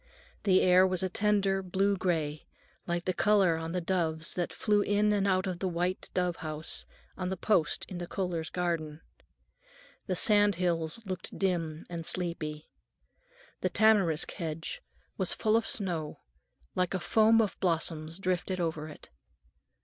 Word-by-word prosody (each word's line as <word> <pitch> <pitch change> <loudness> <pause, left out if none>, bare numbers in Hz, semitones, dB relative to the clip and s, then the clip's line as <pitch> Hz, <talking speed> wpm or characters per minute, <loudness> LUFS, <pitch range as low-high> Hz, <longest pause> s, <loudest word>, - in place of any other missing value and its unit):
The 190 -2 +4
air 185 +1 +6
was 185 -1 +1
a 185 - 0
tender 200 0 +1
blue 195 +2 +1
gray, 160 -5 -2 0.4
like 175 0 -2
the 185 - 0
color 195 -4 +3
on 165 0 -5
the 180 +1 -1
doves 165 -3 0
that 175 -1 -2
flew 210 -1 +1
in 205 +1 +2
and 200 -1 +1
out 185 -1 +2
of 185 -2 -3
the 190 - -1
white 180 +1 -2
dove 180 -2 0
house 155 0 -3 0.3
on 185 -1 -3
the 190 - -3
post 180 -5 +1
in 180 -3 -7
the 175 - -5
Kohlers' 170 -4 -3
garden. 165 -3 -2 1.1
The 185 - 0
sand 205 0 +4
hills 170 0 +1
looked 185 -2 -6
dim 170 -5 -1
and 170 -1 -5
sleepy. 160 -3 -3 0.9
The - - 0
tamarisk 200 -8 +3
hedge 165 - -5 0.4
was - - +2
full 215 -1 +1
of 225 0 +1
snow, 175 - -3 0.5
like 180 +1 0
a - - -1
foam 220 +5 +4
of 215 -3 0
blossoms 165 -2 -1
drifted 185 0 -2
over 160 -3 -2
it. 150 - -13
180 Hz, 155 wpm, -30 LUFS, 165-195 Hz, 1.1 s, air